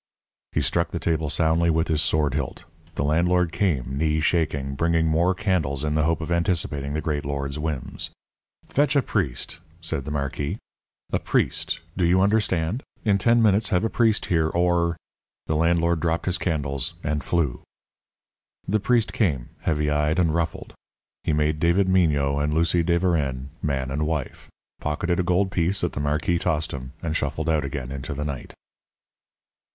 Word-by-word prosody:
He - - 0
struck - - +1
the - - -4
table 80 -2 0
soundly 80 +2 +2
with 80 0 +2
his 80 -1 +2
sword 75 -4 +1
hilt. 70 -3 -4 0.3
The - - -1
landlord 85 +3 +2
came, 70 -9 -1
knee 80 0 +2
shaking, 75 -4 0
bringing 80 +3 +1
more 85 +4 +2
candles 80 -8 0
in 75 -1 0
the 75 -1 +2
hope 80 0 +1
of 80 - -4
anticipating 80 -5 0
the 80 - -1
great 75 -2 -2
lord's 70 0 -3
whims. 75 -5 -4 0.6
"Fetch 145 +1 +1
a 140 - +4
priest," 80 - -2 0.2
said 80 -5 -2
the - - -4
marquis, 70 +4 -2 0.6
"a - - +2
priest; - - 0
do 90 - 0
you 90 +2 +4
understand? 100 0 +1 0.2
In 100 -2 +3
ten 115 +4 +4
minutes 105 0 +4
have 90 +2 +2
a 115 - 0
priest 115 -3 +2
here, 80 -3 +2
or 85 0 +1 0.2
" - - -69
The 80 - -1
landlord 85 +1 +2
dropped 85 0 0
his 90 -1 0
candles 70 -6 -1
and 75 -1 -1
flew. 75 -6 0 1.1
The 110 +3 +2
priest 115 +2 +1
came, 75 - 0
heavy 75 -2 0
eyed 75 +2 +1
and 85 -4 +2
ruffled. 85 -1 -2 0.5
He - - 0
made 75 0 +1
David 85 +4 +3
Mignot 75 -6 +2
and 75 +1 0
Lucie 85 +1 +3
de 85 +1 +2
Verennes 70 -7 0
man 65 -3 -1
and 75 +3 -1
wife, 75 -5 -4 0.3
pocketed 85 +4 -1
a - - +2
gold 95 +2 +1
piece 90 +2 +1
that - - -1
the - - -4
marquis 75 +4 0
tossed 80 -3 0
him, 65 0 -7
and 80 -1 -2
shuffled 80 +2 -2
out 80 -2 +2
again 65 -2 -4
into 70 +1 -5
the 75 +1 -3
night. 70 -3 -6
80 Hz, 175 wpm, -24 LUFS, 75-90 Hz, 1.1 s, a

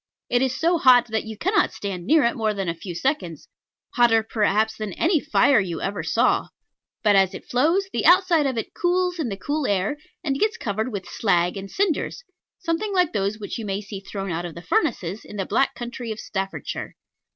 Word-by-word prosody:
It 245 - +3
is 260 -1 0
so 340 +1 +2
hot 245 -3 +6
that 220 0 -1
you 220 -1 -7
cannot 385 - +1
stand 185 -3 -5
near 315 -2 +5
it 235 - +2
more 215 -2 0
than 195 -2 -3
a 170 - 0
few 170 +1 -8
seconds; 180 - -2 0.5
hotter, 230 -2 +4
perhaps, 220 0 +1
than 215 -3 -5
any 330 - +2
fire 285 -3 +4
you 175 -4 -3
ever 195 -3 -3
saw: 225 +11 +2 0.6
but 210 -2 +5
as 195 -1 +3
it - - -9
flows, 330 +10 +2
the - - -1
outside 350 -4 +5
of 260 -3 -2
it 225 - -4
cools 360 0 0
in 285 -7 -1
the 195 - -4
cool 290 +7 -2
air, 200 +8 0 0.3
and 275 -4 -1
gets 440 +1 +1
covered 220 - -2
with 200 -3 -5
slag 180 -4 +1
and 195 0 -6
cinders, 390 - -1 0.3
something 375 +4 -2
like 360 -3 +2
those 200 0 -1
which 210 +2 -6
you 225 - -5
may 195 0 -1
see 205 -1 -7
thrown 195 -1 -5
out 165 +1 -2
of 175 -2 -7
the 170 - -9
furnaces 220 - -1
in - - -11
the 195 -2 -2
Black 270 - +1
Country 240 -1 -6
of 220 - -5
Staffordshire. 195 -1 -5
225 Hz, 210 wpm, -23 LUFS, 195-300 Hz, 0.6 s, hot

